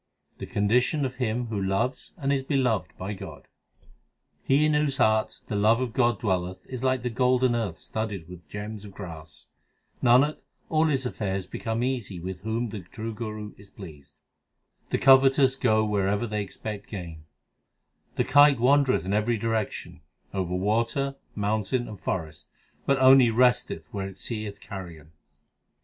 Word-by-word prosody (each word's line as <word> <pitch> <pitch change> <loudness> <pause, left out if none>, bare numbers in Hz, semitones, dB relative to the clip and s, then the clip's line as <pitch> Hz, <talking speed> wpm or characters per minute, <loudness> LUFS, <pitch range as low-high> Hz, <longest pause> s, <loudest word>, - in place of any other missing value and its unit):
The - - -6
condition 125 +8 +1
of 130 -1 -5
him 120 -1 -1
who 105 -3 -2
loves 115 +7 -1
and 140 -3 0
is 135 - +1
beloved 130 -6 0
by 95 +3 -4
God: 95 - -10 0.9
He 140 +3 +3
in 155 - +2
whose 150 -2 +1
heart 110 0 +2
the - - -4
love 110 +3 +4
of 125 -3 -2
God 120 -5 +2
dwelleth 95 -3 -2
is 130 -1 -6
like 130 -1 +1
the 125 - -2
golden 125 +1 +2
earth 105 -8 -2
studded 105 -7 -5
with 85 -4 -12
gems 105 +2 -6
of 100 -2 -11
grass. 80 -6 -9 0.6
Nanak, 130 +5 +4 0.3
all 160 0 +3
his 135 -4 0
affairs 95 -6 -2
become 115 +1 -3
easy 120 -8 -2
with 90 +1 -6
whom 115 +2 -2
the 105 0 -6
true 110 +5 -7
Guru 105 -1 -6
is 100 -1 -15
pleased. 80 -8 -12 0.7
The - - +1
covetous 135 0 +5
go 110 -5 +2
wherever 105 +1 0
they 105 -2 -2
expect 100 +1 -7
gain: 85 -6 -7 0.9
The - - +2
kite 145 -2 +6
wandereth 135 - +3
in 95 - -1
every 110 +3 +1
direction 105 -6 -3 0.3
over 90 -2 -2
water, 115 +8 0 0.2
moun 105 +1 0
tain, 120 +4 -1
and 105 -3 -9
forest, 80 -5 -4 0.4
But 140 - +3
only 130 -2 +7
resteth 120 -8 +2
where 100 -1 -3
it 95 -1 -10
seeth 105 -1 -5
carrion. 85 -6 -9
110 Hz, 160 wpm, -26 LUFS, 95-130 Hz, 0.9 s, only